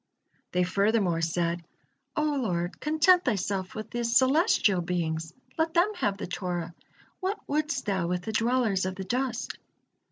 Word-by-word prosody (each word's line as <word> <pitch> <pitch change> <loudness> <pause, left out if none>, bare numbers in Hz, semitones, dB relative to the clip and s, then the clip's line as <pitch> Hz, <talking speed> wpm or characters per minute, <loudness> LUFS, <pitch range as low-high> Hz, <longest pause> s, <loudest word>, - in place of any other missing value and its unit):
They 180 0 +3
furthermore 195 -2 +2
said: 170 +1 0 0.5
"O 305 - +1
Lord, 210 - -1
content 315 +4 +4
Thyself 195 - -1
with 215 +1 -6
the 240 0 -2
celestial 255 - +4
beings, 165 -2 -2 0.3
let 325 +1 +1
them 355 +5 +4
have 200 -2 0
the - - -4
Torah, 175 -2 -3 0.5
what 385 +2 -1
wouldst 300 +2 -1
Thou 190 -4 0
with 180 0 -1
the 220 - -3
dwellers 225 -4 +1
of 185 - -4
the 190 - -5
dust?" 250 +4 -2
205 Hz, 150 wpm, -28 LUFS, 180-260 Hz, 0.5 s, content